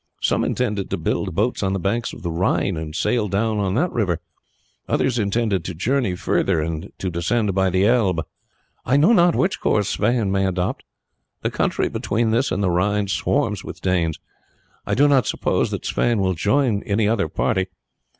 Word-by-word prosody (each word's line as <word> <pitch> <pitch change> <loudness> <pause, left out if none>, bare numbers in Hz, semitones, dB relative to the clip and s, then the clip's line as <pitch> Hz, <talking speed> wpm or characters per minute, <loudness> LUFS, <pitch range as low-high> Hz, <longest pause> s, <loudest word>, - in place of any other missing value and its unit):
Some - - +1
intended 105 -6 -1
to - - -2
build - - -2
boats 110 +6 0
on 95 -1 0
the 95 - -1
banks 115 +6 -1
of - - -11
the 85 - -2
Rhine 90 +2 0
and 80 -1 -6
sail 110 +3 +1
down 105 +3 0
on 95 -1 0
that 175 +8 +1
river, 90 -8 0 0.7
others 125 -2 +1
intended 100 -3 0
to 90 - -5
journey 115 - 0
further 85 -2 0
and 80 +4 -4
to 95 - -3
descend 100 +5 0
by 95 0 +2
the 95 +2 +2
Elbe. 100 -8 +2 0.6
I 130 +4 +2
know 160 +11 +5
not 175 -4 +4
which 190 +1 0
course 105 -2 +1
Sweyn 110 -2 +1
may 95 0 +1
adopt. 90 -1 -2 0.6
The - - 0
country - - 0
between 110 +2 -1
this 120 +5 +1
and 100 +2 0
the 90 - +2
Rhine 100 +3 +1
swarms 85 -3 0
with - - -8
Danes. 85 -4 0 0.7
I - - +1
do 145 +3 +5
not 135 -6 +3
suppose - - 0
that - - -5
Sweyn 120 -3 +1
will 95 -1 +1
join 105 - +1
any 105 +1 0
other 105 -6 +1
party. 95 +3 0
100 Hz, 190 wpm, -22 LUFS, 90-115 Hz, 0.7 s, know